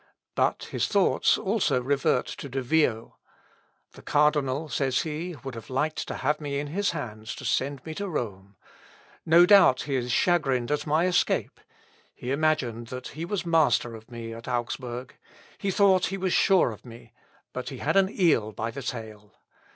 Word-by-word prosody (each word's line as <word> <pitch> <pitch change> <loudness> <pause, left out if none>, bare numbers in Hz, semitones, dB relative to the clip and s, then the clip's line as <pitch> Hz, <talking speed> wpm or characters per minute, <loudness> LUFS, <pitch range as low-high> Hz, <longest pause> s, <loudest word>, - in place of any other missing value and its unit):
But - - +1
his - - 0
thoughts - - +3
also 200 - +1
revert 130 -1 +1
to 140 - -7
De 135 +1 -3
Vio. 125 -5 0 0.7
"The - - -14
cardinal," 150 0 +1
says 135 -4 0
he, 165 +3 -4
"would 135 -1 -6
have 115 -1 -9
liked 150 +4 -1
to - - -4
have 150 +3 -1
me 140 -1 -3
in 145 - -2
his 200 +6 0
hands 110 -8 -5
to - - -9
send 140 0 -1
me 160 - -5
to 200 +4 -4
Rome. 100 - -5 0.7
No 170 +2 +7
doubt 190 -9 +6
he 140 - -4
is 125 -2 -1
chagrined 135 -6 +1
at 150 - -1
my 155 +4 +2
escape. 185 -1 0 0.6
He 125 - -5
imagined 135 -6 0
that 125 +2 -7
he 160 +4 -6
was 190 0 -3
master 150 -8 +2
of 110 0 -12
me 115 -1 -7
at 115 +1 -10
Augsburg 125 +1 -4 0.4
he 200 - -1
thought 195 -1 +4
he 195 - -4
was 185 -1 -1
sure 190 -10 +4
of 105 - -11
me; 120 -1 -13 0.4
but - - -5
he - - -7
had - - -1
an 195 -1 +4
eel 160 - +2
by 115 +2 -4
the 140 - -7
tail. 110 -4 -7
140 Hz, 180 wpm, -26 LUFS, 120-165 Hz, 0.7 s, No